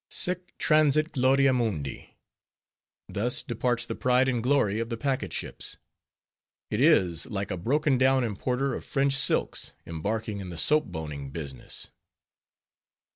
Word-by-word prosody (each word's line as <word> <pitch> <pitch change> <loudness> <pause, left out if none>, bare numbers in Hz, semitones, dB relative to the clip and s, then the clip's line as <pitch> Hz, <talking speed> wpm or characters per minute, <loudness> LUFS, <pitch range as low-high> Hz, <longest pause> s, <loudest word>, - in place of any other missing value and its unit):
Sic 180 0 -1
transit 155 0 +3
gloria 135 0 +3
mundi! 100 - -3 0.9
Thus 120 +5 -1
departs 120 0 -1
the - - -4
pride 125 +1 +2
and 120 -3 0
glory 115 -5 +2
of 115 0 -3
packet 135 -1 -1
ships! - - -5 0.9
It 105 - 0
is 95 - +3
like 100 -4 -4
a - - -1
broken 135 - +1
down 130 0 +4
importer 125 +5 -1
of - - -5
French 135 0 +1
silks 135 +2 +1
embarking 105 +6 -3
in 95 -2 -7
the 85 - -7
soap 150 - +4
boning 75 -5 -6
business. 70 -3 -8
125 Hz, 130 wpm, -27 LUFS, 100-135 Hz, 0.9 s, down